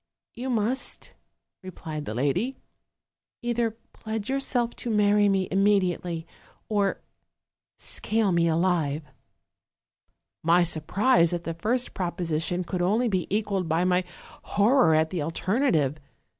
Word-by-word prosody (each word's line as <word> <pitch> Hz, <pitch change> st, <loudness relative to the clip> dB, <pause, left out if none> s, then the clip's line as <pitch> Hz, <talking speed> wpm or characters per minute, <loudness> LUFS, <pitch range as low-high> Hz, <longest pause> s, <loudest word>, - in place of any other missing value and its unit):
" -, -, -67 dB
'You 250 Hz, +2 st, -5 dB
must,' 240 Hz, +2 st, -2 dB, 0.5 s
replied 160 Hz, -5 st, -7 dB
the 110 Hz, -, -5 dB
lady, 175 Hz, -, 0 dB, 0.9 s
'either 235 Hz, -1 st, +1 dB, 0.2 s
pledge 220 Hz, +2 st, -4 dB
yourself 250 Hz, -3 st, 0 dB
to 240 Hz, -, -4 dB
marry 205 Hz, -1 st, +4 dB
me 190 Hz, -1 st, +1 dB
immediately, 185 Hz, -4 st, +1 dB, 0.4 s
or 205 Hz, -2 st, 0 dB, 0.8 s
scale 220 Hz, -2 st, 0 dB
me 170 Hz, -1 st, +3 dB
alive/ 165 Hz, -3 st, +1 dB, 1.4 s
"My 170 Hz, +2 st, +4 dB
surprise 175 Hz, -, +3 dB
at 175 Hz, -1 st, -3 dB
the 165 Hz, -, -3 dB
first 230 Hz, +9 st, -1 dB
proposition 175 Hz, -1 st, -2 dB
could 180 Hz, 0 st, -3 dB
only 220 Hz, +7 st, +2 dB
be 185 Hz, -4 st, -1 dB
equaled 200 Hz, -4 st, -1 dB
by 165 Hz, +2 st, +2 dB
my 180 Hz, 0 st, +2 dB, 0.4 s
horror 210 Hz, -, +4 dB
at 160 Hz, 0 st, +2 dB
the 180 Hz, -4 st, -2 dB
alternative. 165 Hz, -, 0 dB
185 Hz, 120 wpm, -26 LUFS, 165-220 Hz, 1.4 s, marry